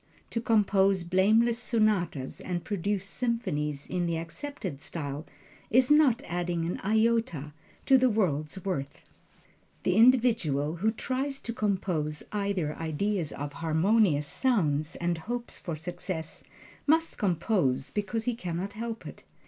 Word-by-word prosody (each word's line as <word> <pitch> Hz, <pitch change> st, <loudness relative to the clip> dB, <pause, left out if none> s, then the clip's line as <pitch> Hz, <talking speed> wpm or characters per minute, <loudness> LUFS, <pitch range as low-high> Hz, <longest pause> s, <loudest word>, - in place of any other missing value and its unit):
To 230 Hz, -, -1 dB
compose 200 Hz, -4 st, +3 dB
blameless 215 Hz, +7 st, +3 dB
sonatas 215 Hz, -, 0 dB
and 175 Hz, -2 st, -3 dB
produce 200 Hz, -1 st, -2 dB
symphonies 190 Hz, -, -2 dB
in 175 Hz, -1 st, -1 dB
the 165 Hz, -1 st, 0 dB
accepted 170 Hz, -, -6 dB
style, 145 Hz, -2 st, -5 dB, 0.4 s
is 255 Hz, +4 st, +4 dB
not 285 Hz, -4 st, +5 dB
adding 175 Hz, -1 st, -2 dB
an 175 Hz, -, -3 dB
iota 220 Hz, -8 st, +1 dB, 0.3 s
to 265 Hz, -1 st, +6 dB
the 255 Hz, 0 st, +4 dB
world's 180 Hz, -4 st, -1 dB
worth. 140 Hz, -8 st, -3 dB, 0.8 s
The 180 Hz, -, +2 dB
individual 220 Hz, -, +4 dB
who 215 Hz, +6 st, +2 dB
tries 265 Hz, +5 st, -2 dB
to 230 Hz, -, -4 dB
compose 180 Hz, -8 st, -1 dB
either 200 Hz, -7 st, -1 dB
ideas 165 Hz, +1 st, -1 dB
or 145 Hz, +1 st, -5 dB
harmonious 160 Hz, +1 st, +2 dB
sounds, 155 Hz, -, +1 dB
and 170 Hz, -1 st, -1 dB
hopes 240 Hz, +7 st, -5 dB
for 170 Hz, -, -4 dB
success, 165 Hz, 0 st, -5 dB, 0.4 s
must 325 Hz, +2 st, +2 dB
compose 170 Hz, -, +1 dB
because 215 Hz, +2 st, -2 dB
he 245 Hz, -, +1 dB
can 180 Hz, -7 st, -4 dB
not 195 Hz, +3 st, -4 dB
help 225 Hz, +1 st, -5 dB
it. -, -, -9 dB
190 Hz, 130 wpm, -28 LUFS, 160-225 Hz, 0.8 s, to